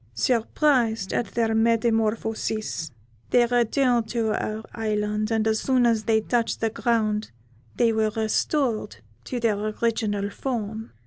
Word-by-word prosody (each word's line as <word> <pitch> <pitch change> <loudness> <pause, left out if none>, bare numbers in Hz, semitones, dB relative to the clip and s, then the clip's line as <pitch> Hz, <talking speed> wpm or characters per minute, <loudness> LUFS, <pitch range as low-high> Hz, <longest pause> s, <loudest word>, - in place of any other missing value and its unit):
Surprised 230 - +1
at 240 - 0
their 225 -1 +1
metamorphosis, 220 -4 0 0.4
they 245 -1 +4
returned 240 0 +2
to 225 -2 0
our 215 +1 -3
island, 210 -1 -1
and 220 -1 +1
as 220 0 +2
soon 255 -2 +2
as 225 -2 +2
they 220 -1 +3
touched 230 +1 0
the 225 -1 0
ground 215 -2 0 0.5
they 230 -1 +3
were 220 0 +2
restored 225 +3 -1 0.3
to 250 - -4
their 220 -3 +1
original 215 -1 -1
form. 220 -3 -4
225 Hz, 130 wpm, -25 LUFS, 215-235 Hz, 0.5 s, they